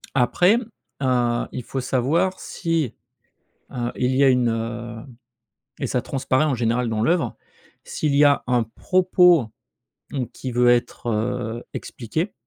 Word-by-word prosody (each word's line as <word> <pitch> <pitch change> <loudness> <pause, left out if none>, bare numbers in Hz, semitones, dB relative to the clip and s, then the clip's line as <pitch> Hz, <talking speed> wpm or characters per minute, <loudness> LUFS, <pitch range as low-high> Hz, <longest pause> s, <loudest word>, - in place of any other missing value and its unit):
Après, 175 - +4 0.4
heu, 120 -2 +1
il 125 - -5
faut 135 - -4
savoir 150 +9 0
si, 165 - -2 0.8
heu, 120 -1 -2
il 125 +1 +1
y 135 - +3
a - - +6
une, 125 -2 +3
heu, 115 0 -4 0.8
et 135 - -2
ça 125 0 -1
transparaît, 135 +1 0
en 150 -3 +1
général, 120 +1 0
dans 110 -1 -1
l'œuvre, 160 -4 +1 0.5
s'il 150 -2 -1
y 145 - +6
a 140 -1 +4
un 125 -2 +2
propos, 180 - +3 0.7
mmh, 130 -4 -2
qui 130 - -6
veut 120 0 +4
être, 120 0 0
heu, 115 +1 -2
expliqué 160 - -4
125 Hz, 145 wpm, -23 LUFS, 120-145 Hz, 0.8 s, a